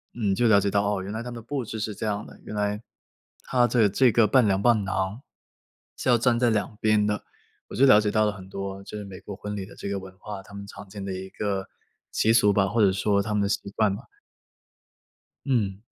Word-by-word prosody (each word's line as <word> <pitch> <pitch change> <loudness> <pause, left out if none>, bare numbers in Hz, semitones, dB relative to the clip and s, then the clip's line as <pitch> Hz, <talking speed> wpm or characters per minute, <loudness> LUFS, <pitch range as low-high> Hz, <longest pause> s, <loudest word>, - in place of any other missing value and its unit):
嗯， 105 -5 0
就 120 +5 +2
了 105 -3 +6
解 100 0 0
到， 100 0 +2
哦， 100 -2 -1
原 95 - -6
来 110 +2 -4
他 125 - -6
们 - - -7
的 115 - -7
布 140 +1 -3
置 110 0 -6
是 110 0 -3
这 110 - -3
样 105 0 -2
的， - - -14
原 - - -7
来 105 0 -1 0.6
他 125 -1 +2
的 115 -4 +4
这 125 +5 +4
个 110 -1 +4
伴 130 +2 +4
娘 95 -1 +2
伴 110 -1 +4
郎 95 +4 -2 0.8
是 - - -2
要 120 - +6
站 120 0 +2
在 120 -1 +3
两 105 -1 -1
边 110 -1 +3
的， 105 0 -1 0.5
我 - - -7
就 135 - +5
了 120 -6 +7
解 105 - 0
到 110 +1 +2
了 105 - +1
很 95 -2 -11
多 95 0 -5
就 105 - -8
是 105 - -6
美 95 -2 -9
国 100 - -8
婚 105 +1 -6
礼 95 -2 -5
的 - - -14
这 - - -7
个 100 0 -2
文 95 0 -12
化， 105 -2 -7
他 100 +1 -14
们 100 0 -7
常 100 0 -11
见 100 0 -7
的 95 - -3
一 95 +1 -6
个 100 -1 -3 0.4
习 110 - +3
俗 110 -3 +5
吧， 100 -1 +2
或 110 +4 +1
者 100 -2 +5
说 100 +1 +1
他 105 +1 -2
们 105 - +2
的 - - +1
习 100 - -2
惯 105 -3 +2
吧。 110 - -11 1.4
嗯。 105 -8 0
105 Hz, 275 characters per minute, -26 LUFS, 100-110 Hz, 1.4 s, 了